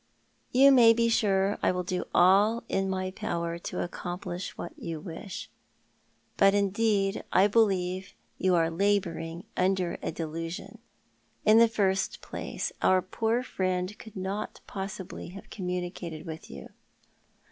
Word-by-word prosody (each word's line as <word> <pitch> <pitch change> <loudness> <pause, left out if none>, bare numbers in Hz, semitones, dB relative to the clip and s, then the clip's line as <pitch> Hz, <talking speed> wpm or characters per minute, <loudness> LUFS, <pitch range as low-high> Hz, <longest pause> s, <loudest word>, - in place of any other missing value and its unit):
You 275 +2 +7
may 235 -4 +8
be 230 0 +2
sure 200 -2 +2
I - - +3
will 180 0 -2
do 180 +1 -2
all 200 +6 +4
in 195 0 0
my 185 0 -2
power 170 -5 -3
to - - -3
accomplish 175 +1 -5
what 175 - -6
you 165 -2 -5
wish. 195 +8 -7 0.9
Bat, 195 0 +5
indeed, 200 0 +1
I 190 - +5
believe 190 -4 +1 0.2
you 185 -1 +3
are 165 -1 +2
labouring 170 -3 0
under 185 -1 +1
a - - -2
delusion. 165 +1 -5 0.7
In 215 +1 +7
the 230 - +7
first 195 -4 0
place - - -4
our 185 -1 +4
poor 225 +5 0
friend 185 -2 -2
could 220 - -12
not 195 +2 -4
possibly 190 -1 -6
have 195 +2 -11
communicated 180 -3 -4
with 160 0 -8
you." 70 -2 -9
190 Hz, 135 wpm, -28 LUFS, 175-205 Hz, 0.9 s, may